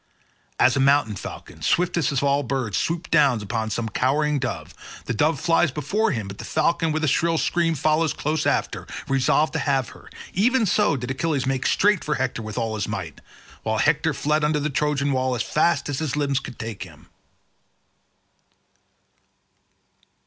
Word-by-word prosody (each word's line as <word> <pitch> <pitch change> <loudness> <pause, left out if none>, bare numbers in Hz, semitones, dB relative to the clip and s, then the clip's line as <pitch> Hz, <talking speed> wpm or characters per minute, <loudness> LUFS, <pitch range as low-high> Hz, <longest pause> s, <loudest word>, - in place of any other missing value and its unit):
As 130 - +5
a - - +1
mountain 135 -5 +3
falcon, - - -9
swiftest 175 -4 +1
of 140 -1 0
all 140 0 +2
birds, 125 -6 -2
swoops 170 +2 -2
down 140 -6 +4
upon 110 +2 -3
some 110 +1 -2
cowering 145 +6 +1
dove—the 125 -1 -6
dove 150 +6 +1
flies 170 -1 +3
before 150 +11 0
him 110 -4 -3
but 100 0 -9
the - - -6
falcon 165 +1 +1
with 155 +1 -1
a - - +2
shrill 165 +4 +2
scream 165 0 +1
follows 155 +2 +2
close 155 +2 -1
after, - - -1 0.2
resolved 135 +3 +2
to - - -1
have 135 -4 0
her—even 230 +5 -1
so 205 -5 +2
did 125 +1 -4
Achilles 140 -1 -1
make 130 -1 0
straight 205 -2 +3
for 150 - -1
Hector 130 -3 -2
with 110 0 -7
all 115 -2 -1
his 105 -3 -2
might, - - -5 0.4
while - - -1
Hector - - +2
fled 150 +1 0
under 150 0 +2
the 150 +1 -2
Trojan 145 0 0
wall 130 -1 0
as 120 - -1
fast 155 -2 +1
as 145 -2 -2
his 155 -4 -2
limbs 140 -2 0
could 135 - -9
take 110 -2 -6
him. 80 -3 -11
140 Hz, 170 wpm, -23 LUFS, 125-155 Hz, 0.4 s, As